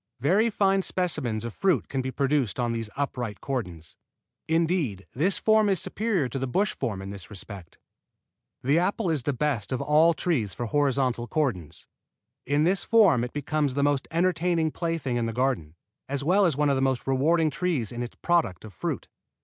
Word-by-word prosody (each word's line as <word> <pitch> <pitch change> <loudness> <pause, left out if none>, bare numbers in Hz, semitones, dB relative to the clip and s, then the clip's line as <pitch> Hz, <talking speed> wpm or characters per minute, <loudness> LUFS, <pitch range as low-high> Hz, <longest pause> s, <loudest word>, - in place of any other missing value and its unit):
Very 195 - +3
fine 195 -2 +2
specimens 150 - -2
of 120 - -5
fruit 185 - +1
can 135 - -2
be 130 - -3
produced 135 -4 0
on 120 -1 0
these 115 -2 -3
upright 125 -7 -3
cordons. 90 - -5 0.5
Indeed 160 - 0
this 180 +9 +1
form 215 -1 +3
is 190 -3 +2
superior 200 - 0
to 135 - -4
the 130 - -2
bush 195 +11 +1
form 105 -8 -3
in 95 - -6
this 95 -5 -10
respect. 95 -3 -10 0.9
The 140 +6 +3
apple 185 +1 0
is 155 -4 +1
the 145 - -1
best 135 -6 -1
of 130 - -1
all 160 +3 +4
trees 130 - -1
for 120 - -3
horizontal 130 -2 +1
cordons. 110 - -2 0.6
In 145 +1 +2
this 185 +3 +2
form 195 - +4
it 125 - -4
becomes 145 -1 -1
the 140 - +1
most 145 -2 +1
entertaining 170 -1 +1
plaything 165 -8 -2
in 115 -1 0
the 115 - -3
garden, 120 - -1 0.3
as 140 0 -2
well 190 +5 +4
as 155 -5 -1
one 150 -1 +2
of - - +2
the 135 - 0
most 135 -2 0
rewarding 155 +4 +2
trees 140 - -1
in 120 0 -5
its 120 - -6
product 160 - +1
of 105 - -11
fruit. 80 - -4
140 Hz, 190 wpm, -26 LUFS, 120-170 Hz, 0.9 s, all